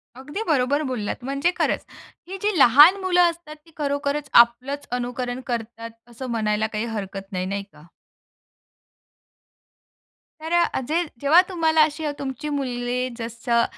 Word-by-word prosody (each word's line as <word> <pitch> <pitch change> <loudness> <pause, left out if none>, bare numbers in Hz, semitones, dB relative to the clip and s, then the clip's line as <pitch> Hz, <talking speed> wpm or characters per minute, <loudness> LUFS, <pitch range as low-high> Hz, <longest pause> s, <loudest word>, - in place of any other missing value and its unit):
अगदी 290 - -6
बरोबर 285 0 +2
बोललात. 240 0 -4
म्हणजे 275 +6 0
खरंच - - 0 0.4
ही 385 +2 -6
जी 415 -3 0
लहान 290 +10 +8
मुलं 360 -1 +3
असतात 330 -2 -9
ती 330 - -20
खरोखरच 285 0 -2
आपलंच 255 +5 -8
अनुकरण 245 0 -4
करतात 230 -1 -5 0.2
असं 240 +3 -8
म्हणायला 215 -2 0
काही 220 +1 -3
हरकत 195 -2 -6
नाही. 185 -1 -2
नाही 200 +1 -3
का? 175 -5 -19 2.5
तर 320 +1 -6
अ, 345 0 +2
जे 330 +3 +1 0.2
जेव्हा 310 +5 +6
तुम्हाला 320 -3 +2
अशी 305 +1 -2 0.2
तुमची 275 +2 -5
मुले 250 -1 -2
जसं 235 0 -1
260 Hz, 135 wpm, -23 LUFS, 230-305 Hz, 2.5 s, लहान